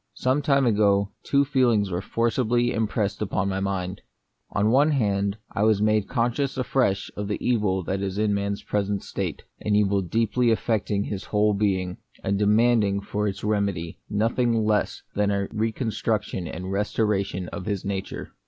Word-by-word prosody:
Some 130 +3 +1
time 140 -2 +3
ago, 100 -3 +3
two 140 0 +2
feelings 120 -8 +2
were 90 +1 -1
forcibly 120 +2 +1
impressed 110 -2 -1
upon 95 -1 0
my 95 0 -1
mind. 95 -1 -3 0.5
On 105 - -1
the - - +4
one 140 +5 +5
hand, 100 -7 +1
I - - -2
was 110 -1 +4
made 105 -1 +2
conscious 125 +3 0
afresh 125 -6 0
of 105 0 -4
the 105 - -1
evil 105 -6 +1
that 95 +3 -2
is 95 0 -3
in 105 -1 +2
man's 100 0 -2
present 100 -1 -1
state; - - -4 0.2
an 105 -1 0
evil 100 -1 +3
deeply 115 +6 +1
affecting 105 -3 0
his 100 -2 -5
whole 105 0 +2
being, 95 -3 0 0.3
and 100 +1 0
demanding 105 -1 +3
for 105 +1 -2
its 100 -1 -4
remedy 100 -6 -1
nothing 115 +1 +1
less 105 -1 0
than 105 0 +1
a 100 -1 0
reconstruction 110 -4 -1
and 90 +4 -6
restora 105 0 +1
tion 95 -2 -5
of 90 - -7
his 100 -3 -2
nature. 100 -1 -4
105 Hz, 170 wpm, -25 LUFS, 100-115 Hz, 0.5 s, one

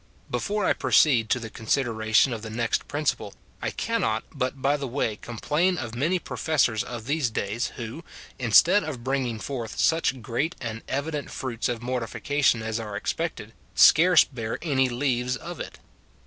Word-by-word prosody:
Before 210 0 -1
I - - +4
proceed 120 -8 +3
to 125 - +2
the 110 -2 -7
consideration 110 +1 +1
of 115 - -5
the 110 - -7
next 115 +1 -1
princi^ 145 0 0
pie, - - -9 0.3
I - - -1
cannot 110 0 -1
but 135 -1 -2
by 140 +2 +2
the 140 -2 -4
way 120 -4 -1
complain 150 - -1
of 120 -6 -5
many 155 +10 +1
professors 135 -10 0
of 120 -2 -7
these 140 -2 0
days, 110 +2 -2
who, 120 +8 -7 0.4
instead 165 - +5
of 135 -7 -6
bringing 130 -3 -1
forth 115 -1 -5
such 160 -5 +2
great 140 +10 -1
and 115 -1 -5
evident 145 +1 -3
fruits 120 -3 -3
of 120 -1 -3
mortification 125 +1 0
as 110 +1 -2
are 105 -2 -6
expected, - - -3 0.2
scarce 175 0 +7
bear 115 -4 -5
any 135 -5 +2
leaves 125 0 0
of 175 +1 -8
it. - - -7
125 Hz, 165 wpm, -26 LUFS, 115-145 Hz, 0.4 s, scarce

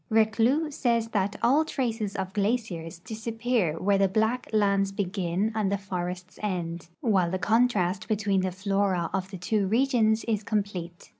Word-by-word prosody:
Reclus 225 +8 +2
sa, 240 -4 +2
ys 225 0 -3
that 205 -1 0
" - - -16
all 275 +6 +5
traces 225 -9 -2
of 190 -1 -3
glaciers 200 -6 -1
disappear 220 -3 -1
where 195 +1 +2
the 195 - +4
black 220 +6 0
lands 200 -2 +2
begin 195 +1 -1
and 210 -3 0
the 200 - +1
forests 180 -1 -5
end, 175 -5 -3
while 195 -8 +2
the 185 - -1
contrast 215 -3 +1
between 205 -3 +1
the 185 0 -1
flora 190 -2 0
of 190 -1 -2
the 190 - -7
two 195 +3 0
regions 225 -1 +2
is 220 -3 0
complete." 200 -5 -3
200 Hz, 165 wpm, -27 LUFS, 185-225 Hz, -, all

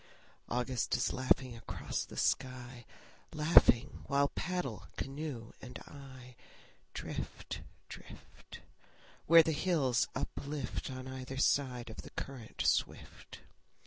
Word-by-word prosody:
August 125 0 0
is - - +1
laughing 130 -1 +2
across 115 - -3
the - - -11
sky, 125 -2 -1 0.5
Laughing 150 -5 +5
while 140 0 +3
paddle, 155 - -3
canoe 135 -5 -4
and 125 -1 -7
I, 130 -3 -11 0.6
Drift, - - -5 0.3
drift, - - -12 0.7
Where 165 0 +10
the 160 - +1
hills 150 -6 +2
uplift 140 -2 -3
On 130 0 -6
either 130 0 -6
side 125 -4 +2
of 110 - -10
the - - -8
current 130 -5 -5
swift. - - -1
130 Hz, 110 wpm, -34 LUFS, 125-145 Hz, 0.7 s, Where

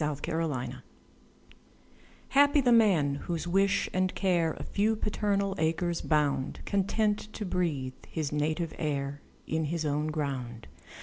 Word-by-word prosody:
Y 150 -1 0
Z - - -15
Solitude 160 -6 -2 1.5
HAPPY 285 +1 +5
the 250 -2 +3
man, 190 -12 +4
whose 170 -1 -2
wish 195 +3 +2
and 185 0 0
care 170 -5 +2
A - - -7
few 215 +2 +1
paternal 205 -2 0
acres 165 +2 0
bound, 145 -3 0
Content 210 +2 0
to 210 - -4
breathe 155 -8 -1
his 155 -3 -3
native 155 +2 -1
air 145 -2 -2 0.2
In 160 0 -1
his 160 +1 -2
own 150 +1 0
ground. 135 -7 -3
165 Hz, 135 wpm, -29 LUFS, 150-200 Hz, 1.5 s, HAPPY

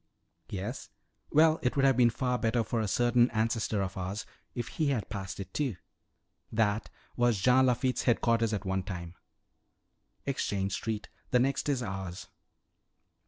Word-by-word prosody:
"Yes? 105 +7 -5 0.4
Well, 160 +1 +5
it 125 - 0
would 135 -1 +3
have 135 -1 +5
been 120 -1 +5
better 120 -1 0
for 115 - -2
a 110 - -1
certain 120 +3 +3
ancestor 110 -2 0
of 95 0 -4
ours 95 +3 -4 0.3
if 120 - -3
he 155 - -1
had 130 -7 -1
passed 100 -2 -5
it, 95 -1 -7
too. 135 -8 -1 0.8
That 110 -1 +1 0.3
was 120 -3 +3
Jean 130 +6 +5
Lafitte's 125 +1 +1
headquarters 115 -2 +3
at 105 -2 -2
one 95 0 0
time. 90 -2 -6 1.1
Exchange 100 -8 -1
Street 110 0 -3 0.2
the 125 - +4
next 135 +3 +1
is 130 -3 +1
ours." 95 -3 -5
115 Hz, 150 wpm, -30 LUFS, 100-125 Hz, 1.1 s, Well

